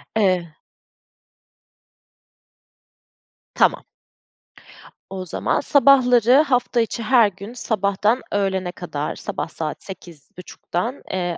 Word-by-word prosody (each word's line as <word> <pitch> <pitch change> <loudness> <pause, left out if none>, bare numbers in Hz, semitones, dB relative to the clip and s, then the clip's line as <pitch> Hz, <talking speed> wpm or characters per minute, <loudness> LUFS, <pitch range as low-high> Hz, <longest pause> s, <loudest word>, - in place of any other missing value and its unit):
Eee 185 -6 +1 3.0
Tamam. - - +2 1.3
O 190 -1 -6
zaman 175 - -1
sabahları 260 -2 +5
hafta 250 -4 +1
içi 225 +1 -3
her 235 -1 +5
gün 200 +4 -9
sabahtan 210 +1 0
öğlene 190 -3 -1
kadar, 155 -5 -5
sabah - - -5
saat 155 -1 -4
08.30'dan 180 - -7
eee, 175 -2 -2
200 Hz, 85 wpm, -21 LUFS, 180-245 Hz, 3.0 s, sabahları